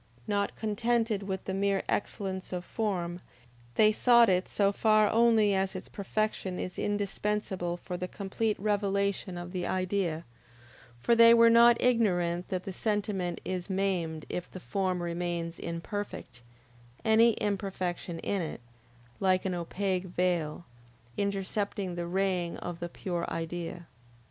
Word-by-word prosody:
Not 200 Hz, 0 st, -1 dB
contented 225 Hz, 0 st, 0 dB
with 190 Hz, -1 st, -4 dB
the 190 Hz, -, -3 dB
mere 195 Hz, 0 st, +1 dB
excellence 190 Hz, -2 st, -2 dB
of 180 Hz, -1 st, -4 dB
form, 180 Hz, -5 st, -2 dB, 0.5 s
they 215 Hz, 0 st, +6 dB
sought 235 Hz, +1 st, +6 dB
it 185 Hz, 0 st, +1 dB
so 200 Hz, -1 st, +2 dB
far 215 Hz, 0 st, +4 dB
only 225 Hz, -2 st, +4 dB
as 190 Hz, 0 st, 0 dB
its 185 Hz, -, -6 dB
perfection 200 Hz, -2 st, -2 dB
is 180 Hz, -, -5 dB
indispensable 205 Hz, -3 st, -1 dB
for 180 Hz, 0 st, -6 dB
the 180 Hz, -, -3 dB
complete 205 Hz, +3 st, -2 dB
revelation 200 Hz, -2 st, 0 dB
of 175 Hz, 0 st, -6 dB
the 180 Hz, -2 st, -2 dB
idea, 185 Hz, -3 st, -1 dB, 0.7 s
for 235 Hz, -, +2 dB
they 230 Hz, 0 st, +8 dB
were 230 Hz, 0 st, +7 dB
not 235 Hz, 0 st, +7 dB
ignorant 180 Hz, -8 st, +2 dB
that 185 Hz, -1 st, -2 dB
the 195 Hz, -, -6 dB
sentiment 200 Hz, -4 st, -1 dB
is 185 Hz, 0 st, -3 dB
maimed 180 Hz, -5 st, -1 dB
if 180 Hz, -, -4 dB
the 185 Hz, -, -9 dB
form 185 Hz, -2 st, -1 dB
remain 170 Hz, -1 st, -2 dB
imperfect, 170 Hz, -, -5 dB, 0.6 s
any 225 Hz, +1 st, +6 dB
imperfection 190 Hz, -4 st, -3 dB
in 200 Hz, -2 st, -1 dB
it, 160 Hz, -6 st, -5 dB, 0.6 s
like 185 Hz, -1 st, +2 dB
an 190 Hz, -, 0 dB
opaque 185 Hz, +2 st, -2 dB
veil, 175 Hz, -3 st, -1 dB, 0.5 s
intercepting 200 Hz, -1 st, -2 dB
the 175 Hz, 0 st, -4 dB
raying 180 Hz, -2 st, 0 dB
of 175 Hz, -1 st, -6 dB
the 175 Hz, -, -4 dB
pure 175 Hz, -1 st, -4 dB
idea. 170 Hz, +1 st, -4 dB
190 Hz, 140 wpm, -29 LUFS, 175-205 Hz, 0.7 s, they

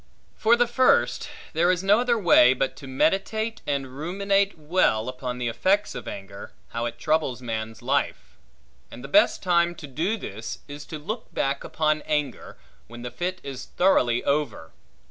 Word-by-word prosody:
For 230 Hz, +2 st, +4 dB
the 245 Hz, +1 st, +3 dB
first; 245 Hz, +2 st, +2 dB, 0.2 s
there 170 Hz, +2 st, +3 dB
is 180 Hz, 0 st, +1 dB
no 205 Hz, +3 st, +5 dB
other 245 Hz, -1 st, +2 dB
way 155 Hz, -, +6 dB
but 135 Hz, +1 st, -1 dB
to 140 Hz, -, -10 dB
meditate, 195 Hz, +11 st, 0 dB
and 135 Hz, -2 st, -2 dB
ruminate 195 Hz, +6 st, 0 dB
well 150 Hz, -8 st, +1 dB
upon 125 Hz, -1 st, -4 dB
the 125 Hz, -1 st, -2 dB
effects 190 Hz, -, +1 dB
of -, -, -7 dB
anger, 100 Hz, 0 st, -8 dB, 0.2 s
how 115 Hz, 0 st, -3 dB
it 120 Hz, -, -7 dB
troubles 155 Hz, -5 st, 0 dB
man's 115 Hz, -1 st, -5 dB
life. 140 Hz, +3 st, -1 dB, 0.5 s
And 125 Hz, -, -11 dB
the -, -, -6 dB
best 205 Hz, +10 st, +4 dB
time 175 Hz, -2 st, +2 dB
to 155 Hz, -, -9 dB
do 165 Hz, -, -1 dB
this, 110 Hz, -, -6 dB
is 145 Hz, 0 st, -9 dB
to 155 Hz, -, -6 dB
look 215 Hz, +10 st, -6 dB
back 140 Hz, +1 st, -1 dB
upon 155 Hz, -1 st, 0 dB
anger, 150 Hz, -4 st, -2 dB, 0.3 s
when 120 Hz, +1 st, -10 dB
the 125 Hz, -, -5 dB
fit 185 Hz, +1 st, -3 dB
is 135 Hz, -2 st, -7 dB
thoroughly 125 Hz, -10 st, +3 dB
over. 140 Hz, -, -1 dB
150 Hz, 170 wpm, -25 LUFS, 125-190 Hz, 0.5 s, way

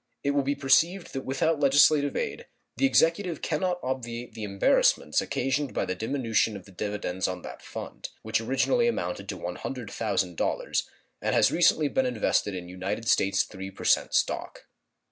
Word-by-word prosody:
It 140 Hz, -, +1 dB
will 140 Hz, 0 st, +2 dB
be 140 Hz, +1 st, -1 dB
perceived 165 Hz, +8 st, +2 dB
that 135 Hz, -, -4 dB
without 145 Hz, +4 st, 0 dB
legislative 145 Hz, +1 st, +4 dB
aid 470 Hz, -, -3 dB, 0.3 s
the 275 Hz, -, +3 dB
Executive 170 Hz, -, +2 dB
can 150 Hz, -1 st, -1 dB
not 180 Hz, -1 st, 0 dB
obviate 120 Hz, -2 st, -4 dB
the 110 Hz, -, -8 dB
embarrassments 100 Hz, -1 st, +2 dB
occasioned 135 Hz, +1 st, -1 dB
by -, -, 0 dB
the -, -, -2 dB
diminution 110 Hz, 0 st, 0 dB
of 95 Hz, -, -13 dB
the 95 Hz, -, -15 dB
dividends 95 Hz, -1 st, -3 dB
on 90 Hz, -, -5 dB
that -, -, -9 dB
fund, -, -, -8 dB
which 110 Hz, +1 st, 0 dB
originally 135 Hz, -, +2 dB
amounted 475 Hz, -, -2 dB
to -, -, -4 dB
$100,000, -, -, -2 dB, 0.4 s
and -, -, 0 dB
has -, -, +4 dB
recently 160 Hz, -3 st, +4 dB
been 130 Hz, -2 st, +1 dB
invested 110 Hz, -4 st, 0 dB
in 90 Hz, -1 st, -6 dB
United 95 Hz, +5 st, -4 dB
States 100 Hz, -1 st, +3 dB
3% 95 Hz, 0 st, -1 dB
stock. -, -, -1 dB
130 Hz, 160 wpm, -27 LUFS, 105-150 Hz, 0.4 s, legislative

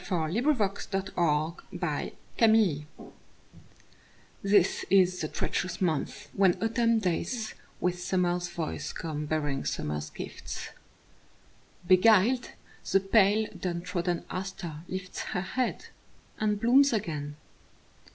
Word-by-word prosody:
Helen 165 Hz, -4 st, 0 dB, 0.2 s
Hunt 205 Hz, -4 st, -2 dB
Jackson 170 Hz, -4 st, 0 dB
November 175 Hz, +1 st, +1 dB, 1.5 s
THIS 195 Hz, -2 st, +3 dB
is 185 Hz, -2 st, +4 dB
the 155 Hz, -, -1 dB
treacherous 175 Hz, +3 st, -2 dB
month 160 Hz, -6 st, -1 dB
when 190 Hz, -3 st, +4 dB
autumn 230 Hz, +1 st, +2 dB
days 215 Hz, +4 st, -1 dB, 0.3 s
With 180 Hz, 0 st, -1 dB
summer's 180 Hz, -1 st, 0 dB
voice 160 Hz, -3 st, -4 dB
come 150 Hz, -2 st, -4 dB
bearing 145 Hz, -3 st, -1 dB
summer's 75 Hz, 0 st, -3 dB
gifts. -, -, -7 dB, 1.2 s
Beguiled, 220 Hz, +6 st, +5 dB, 0.4 s
the 195 Hz, -, +5 dB
pale 205 Hz, +2 st, +3 dB
down 170 Hz, -2 st, -3 dB
trodden 175 Hz, -1 st, -2 dB
aster 185 Hz, -4 st, -5 dB
lifts 185 Hz, 0 st, -5 dB, 0.2 s
Her -, -, 0 dB
head 250 Hz, +6 st, -2 dB, 0.5 s
and 210 Hz, -1 st, +1 dB
blooms 265 Hz, +5 st, +5 dB
again. 150 Hz, -9 st, -3 dB
185 Hz, 100 wpm, -29 LUFS, 165-210 Hz, 1.5 s, Beguiled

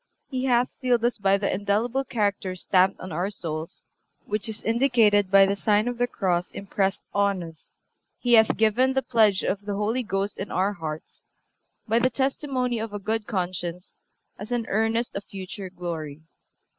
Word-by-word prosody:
He 260 Hz, 0 st, -1 dB
hath 245 Hz, -1 st, +2 dB
sealed 245 Hz, -3 st, +1 dB
us 240 Hz, -2 st, 0 dB
by 195 Hz, 0 st, +3 dB
the 200 Hz, 0 st, -1 dB
indelible 220 Hz, +6 st, 0 dB
character 205 Hz, -7 st, -1 dB
stamped 185 Hz, +1 st, +2 dB
on 185 Hz, -, -7 dB
our 175 Hz, +5 st, -1 dB
souls, 160 Hz, -5 st, -6 dB, 0.4 s
which 210 Hz, +2 st, -2 dB
is 220 Hz, 0 st, -7 dB
indicated 225 Hz, -5 st, +3 dB
by 195 Hz, 0 st, +7 dB
the 200 Hz, +1 st, 0 dB
sign 210 Hz, +2 st, +2 dB
of 245 Hz, -1 st, -3 dB
the 245 Hz, -, +2 dB
cross 180 Hz, -6 st, -1 dB
impressed 195 Hz, 0 st, -2 dB
on 200 Hz, -2 st, +1 dB
us. 165 Hz, -2 st, -13 dB, 0.3 s
He 245 Hz, -1 st, +1 dB
hath 220 Hz, -1 st, +6 dB
given 230 Hz, +5 st, +3 dB
the 265 Hz, 0 st, +1 dB
pledge 215 Hz, -5 st, +3 dB
of 195 Hz, +1 st, -1 dB
the 205 Hz, 0 st, -4 dB
Holy 215 Hz, +5 st, 0 dB
Ghost 200 Hz, -2 st, -3 dB
in 195 Hz, -, -4 dB
our 195 Hz, +3 st, +1 dB
hearts, 155 Hz, -4 st, -7 dB, 0.6 s
by 225 Hz, +2 st, +3 dB
the 255 Hz, -, +3 dB
testimony 260 Hz, -2 st, -1 dB
of 220 Hz, -1 st, -5 dB
a -, -, -2 dB
good 215 Hz, +1 st, -2 dB
conscience, 180 Hz, -3 st, -4 dB, 0.4 s
as 210 Hz, +4 st, -8 dB
an 240 Hz, -2 st, 0 dB
earnest 225 Hz, +3 st, 0 dB
of 200 Hz, -, -3 dB
future 195 Hz, -1 st, -7 dB
glory. 160 Hz, -4 st, -6 dB
205 Hz, 175 wpm, -25 LUFS, 190-235 Hz, 0.6 s, by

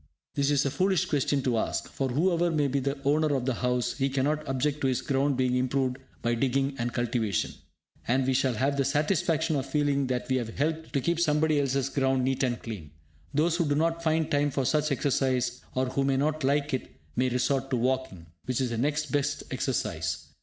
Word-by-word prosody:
This 140 Hz, 0 st, +1 dB
is 145 Hz, -1 st, +2 dB
a 140 Hz, -, 0 dB
foolish 185 Hz, +1 st, +2 dB
question 145 Hz, -4 st, 0 dB
to 120 Hz, -3 st, +1 dB
ask, -, -, -2 dB
for, 135 Hz, -1 st, -2 dB
whoever 170 Hz, +5 st, +2 dB
may 150 Hz, -3 st, +1 dB
be 140 Hz, +1 st, 0 dB
the 140 Hz, +2 st, -2 dB
owner 150 Hz, +1 st, +2 dB
of 130 Hz, -2 st, -1 dB
the 130 Hz, -, +1 dB
house, 125 Hz, 0 st, 0 dB
he 135 Hz, 0 st, +2 dB
cannot 145 Hz, +3 st, 0 dB
object 140 Hz, +3 st, -1 dB
to 135 Hz, -, +2 dB
his 130 Hz, -2 st, +1 dB
ground 140 Hz, 0 st, 0 dB
being 130 Hz, -1 st, +1 dB
improved 130 Hz, 0 st, 0 dB, 0.3 s
by 120 Hz, -, +2 dB
digging 135 Hz, +3 st, 0 dB
and 120 Hz, +1 st, -1 dB
cultivation. 115 Hz, -5 st, 0 dB, 0.6 s
And 130 Hz, +2 st, +2 dB
we 135 Hz, -, +2 dB
shall 130 Hz, -1 st, +1 dB
have 140 Hz, +4 st, 0 dB
the 140 Hz, -, +3 dB
satisfaction 155 Hz, +2 st, +1 dB
of 135 Hz, -1 st, -2 dB
feeling 145 Hz, -2 st, +1 dB
that 125 Hz, -1 st, -2 dB
we 130 Hz, -, +1 dB
have 115 Hz, -3 st, -4 dB
helped 160 Hz, +2 st, -1 dB
to 140 Hz, -, +1 dB
keep 170 Hz, +4 st, 0 dB
somebody 155 Hz, -2 st, +2 dB
else's 135 Hz, -1 st, 0 dB
ground 135 Hz, -1 st, +1 dB
neat 130 Hz, 0 st, 0 dB
and 125 Hz, -3 st, 0 dB
clean. 100 Hz, -10 st, -7 dB, 0.4 s
Those 160 Hz, +3 st, +2 dB
who 170 Hz, -, +1 dB
do 145 Hz, -, +2 dB
not 165 Hz, +2 st, +1 dB
find 160 Hz, -1 st, +1 dB
time 145 Hz, 0 st, +2 dB
for 135 Hz, -1 st, -1 dB
such 150 Hz, +3 st, +1 dB
exercise 130 Hz, -3 st, 0 dB
or 130 Hz, 0 st, +2 dB
who 135 Hz, +2 st, -1 dB
may 135 Hz, -1 st, +2 dB
not 155 Hz, +2 st, 0 dB
like 145 Hz, +2 st, +1 dB
it, 130 Hz, -, -2 dB, 0.3 s
may 125 Hz, +1 st, +2 dB
resort 135 Hz, +2 st, 0 dB
to 130 Hz, -, +1 dB
walking, 125 Hz, -8 st, -1 dB, 0.2 s
which 130 Hz, -1 st, -1 dB
is 130 Hz, -2 st, 0 dB
the 115 Hz, -, -2 dB
next 150 Hz, +4 st, 0 dB
best 145 Hz, -1 st, 0 dB
exercise. -, -, -2 dB
135 Hz, 215 wpm, -28 LUFS, 130-150 Hz, 0.6 s, the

